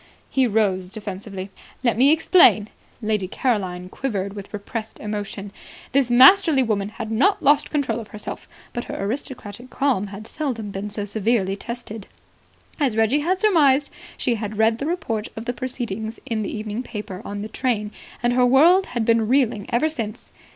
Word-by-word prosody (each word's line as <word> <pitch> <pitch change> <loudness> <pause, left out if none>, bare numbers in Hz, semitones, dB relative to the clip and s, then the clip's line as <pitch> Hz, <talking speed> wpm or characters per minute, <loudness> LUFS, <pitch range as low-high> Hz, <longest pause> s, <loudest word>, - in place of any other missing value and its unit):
He 265 -2 +3
rose 195 -4 +1
defensively. 200 -2 -7 0.3
"Let 235 -3 +2
me 265 +5 +5
explain." 315 - +5 0.3
Lady 210 -3 0
Caroline 185 -6 -1
quivered 200 -3 -3
with 200 -1 -9
repressed 220 +2 -6
emotion. 205 -1 -5 0.4
This 270 -2 +2
masterly 270 +3 +7
woman 205 -4 -1
had 220 0 -6
not 375 - +2
lost 290 +1 +4
control 260 -7 -1
of 220 - -8
herself, 210 0 -8 0.2
but 240 - -4
her - - -6
aristocratic 235 +1 -5
calm 260 -9 0
had 200 +2 -9
seldom 230 -7 -4
been 195 +2 -4
so 205 0 -3
severely 205 -1 0
tested. 225 -1 -7 0.7
As 260 -7 +1
Reggie 225 +6 +3
had 355 +6 +1
surmised, 295 -9 +4 0.3
she 245 - +1
had 215 -2 -4
read 225 +1 +3
the 280 - -2
report 255 -11 -2
of 225 0 -6
the 245 - -2
proceedings 230 -4 -4
in 225 -2 -2
the 205 - -3
evening 215 +1 -4
paper 210 -6 -7
in 205 0 -5
the - - -4
train, 220 -3 -1 0.3
and 240 0 +2
her 250 0 +3
world 320 +10 +5
had 225 - +1
been 230 -1 +3
reeling 235 -5 +1
ever 245 +6 +2
since. 230 -7 -6
225 Hz, 170 wpm, -22 LUFS, 205-260 Hz, 0.7 s, masterly